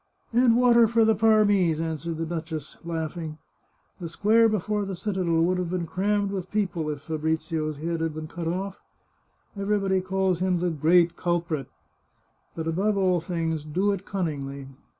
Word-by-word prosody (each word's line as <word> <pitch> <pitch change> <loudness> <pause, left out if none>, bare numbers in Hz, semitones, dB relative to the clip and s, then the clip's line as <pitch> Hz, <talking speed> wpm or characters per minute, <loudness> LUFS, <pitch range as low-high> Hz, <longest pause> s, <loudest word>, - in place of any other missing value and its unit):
" - - -37
And 240 -1 +5
water 240 -2 +6
for 230 0 +3
the 220 - +4
Parmese," 205 -7 +3
answered 165 0 -3
the 165 - -2
duchess, 160 -2 -5
laughing. 160 -1 -4 0.3
" - - -42
The 170 - -4
square 225 +6 +4
before 210 0 -1
the 195 -1 -4
citadel 175 -4 0
would 180 +2 +1
have 180 -2 -2
been 180 -1 -2
crammed 200 +3 0
with 190 -2 -4
people 180 -7 -1
if 145 -2 -4
Fabrizio's 160 0 -2
head 165 +2 -3
had 165 -2 -2
been 155 0 -5
cut 165 +1 -5
off.... 190 +3 -3 0.8
Everybody 195 -2 +1
calls 190 -1 0
him 185 -1 +1
the 175 0 0
great 165 +3 +3
culprit.... 170 -5 -1 0.9
But 160 - -4
above 195 +6 +1
all 185 -2 +2
things, 165 -2 -2
do 185 +7 0
it 195 -1 -3
cunningly 140 -8 -4
175 Hz, 170 wpm, -26 LUFS, 160-200 Hz, 0.9 s, water